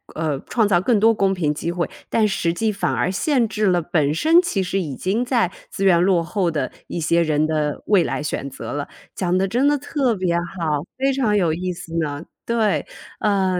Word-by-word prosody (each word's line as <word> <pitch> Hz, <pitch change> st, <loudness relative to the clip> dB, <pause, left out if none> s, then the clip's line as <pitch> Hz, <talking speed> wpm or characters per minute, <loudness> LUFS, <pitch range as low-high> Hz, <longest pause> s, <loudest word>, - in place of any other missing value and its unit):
呃， 155 Hz, -3 st, -1 dB
创 225 Hz, -3 st, +2 dB
造 180 Hz, -4 st, +3 dB
更 225 Hz, +2 st, +2 dB
多 225 Hz, +2 st, +5 dB
公 195 Hz, -3 st, +1 dB
平 160 Hz, -5 st, 0 dB
机 165 Hz, +3 st, -3 dB
会， 175 Hz, -1 st, -1 dB, 0.2 s
但 220 Hz, -2 st, +2 dB
实 175 Hz, -4 st, 0 dB
际 220 Hz, +5 st, 0 dB
反 200 Hz, -, -1 dB
而 185 Hz, -, 0 dB
限 245 Hz, +4 st, +1 dB
制 215 Hz, -1 st, 0 dB
了 180 Hz, -2 st, +3 dB
本 155 Hz, -4 st, +1 dB
身 320 Hz, -, +5 dB
其 280 Hz, -, -1 dB
实 190 Hz, +1 st, -1 dB
已 150 Hz, -7 st, -4 dB
经 195 Hz, -, -1 dB
在 240 Hz, -7 st, +1 dB, 0.2 s
资 195 Hz, -, -4 dB
源 180 Hz, -3 st, +5 dB
落 180 Hz, -2 st, +3 dB
后 180 Hz, +1 st, 0 dB
的 150 Hz, -5 st, -2 dB, 0.2 s
一 -, -, -4 dB
些 170 Hz, +1 st, +2 dB
人 155 Hz, -2 st, +2 dB
的 150 Hz, -2 st, -1 dB
未 200 Hz, -5 st, +4 dB
来 150 Hz, -, -3 dB
选 140 Hz, -2 st, -3 dB
择 120 Hz, -4 st, -7 dB
了。 145 Hz, 0 st, -3 dB, 0.3 s
讲 180 Hz, -1 st, 0 dB
得 195 Hz, -, +1 dB
真 245 Hz, +8 st, +1 dB
的 290 Hz, 0 st, +3 dB
特 275 Hz, -4 st, 0 dB
别 185 Hz, -3 st, 0 dB
好， 170 Hz, -4 st, -2 dB
非 270 Hz, +1 st, +1 dB
常 240 Hz, -6 st, +1 dB
有 175 Hz, -6 st, +2 dB
意 180 Hz, +3 st, -3 dB
思 170 Hz, -2 st, -8 dB
呢。 145 Hz, -1 st, -3 dB, 0.2 s
对， 225 Hz, -3 st, 0 dB, 0.3 s
呃， 190 Hz, -3 st, +1 dB
185 Hz, 235 characters per minute, -21 LUFS, 165-215 Hz, 0.3 s, 多